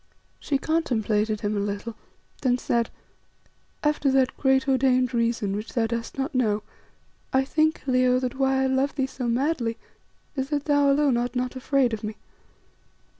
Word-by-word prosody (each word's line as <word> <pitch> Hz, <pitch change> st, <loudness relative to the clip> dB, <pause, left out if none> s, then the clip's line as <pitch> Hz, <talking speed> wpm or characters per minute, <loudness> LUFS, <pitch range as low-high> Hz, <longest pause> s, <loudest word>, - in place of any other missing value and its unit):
She 280 Hz, -, 0 dB
contemplated 220 Hz, -9 st, 0 dB
him 210 Hz, 0 st, -1 dB
a -, -, 0 dB
little, 205 Hz, +3 st, -3 dB, 0.5 s
then 250 Hz, -2 st, +2 dB
said 235 Hz, -2 st, 0 dB, 0.9 s
"After 295 Hz, -1 st, +2 dB
that 265 Hz, -1 st, +2 dB
great 265 Hz, +1 st, +2 dB
ordained 255 Hz, -1 st, +2 dB
reason 230 Hz, -4 st, 0 dB
which 210 Hz, +2 st, -6 dB
thou 235 Hz, -3 st, +1 dB
dost 230 Hz, +2 st, -4 dB
not 270 Hz, +3 st, -2 dB
know, 215 Hz, -5 st, +1 dB, 0.7 s
I 265 Hz, 0 st, +2 dB
think, 315 Hz, +3 st, +1 dB
Leo, 255 Hz, -1 st, +3 dB
that 255 Hz, 0 st, -2 dB
why 265 Hz, 0 st, +2 dB
I -, -, +2 dB
love 265 Hz, +2 st, +1 dB
thee 270 Hz, -2 st, +1 dB
so 260 Hz, -2 st, -5 dB
madly 240 Hz, -1 st, 0 dB, 0.6 s
is 265 Hz, 0 st, -2 dB
that 290 Hz, -1 st, -1 dB
thou 285 Hz, -1 st, +4 dB
alone 280 Hz, -3 st, +3 dB
art 245 Hz, +1 st, -2 dB
not 250 Hz, +1 st, -2 dB
afraid 260 Hz, -2 st, +1 dB
of 220 Hz, -, -4 dB
me. 215 Hz, 0 st, -4 dB
255 Hz, 165 wpm, -25 LUFS, 230-275 Hz, 0.9 s, thou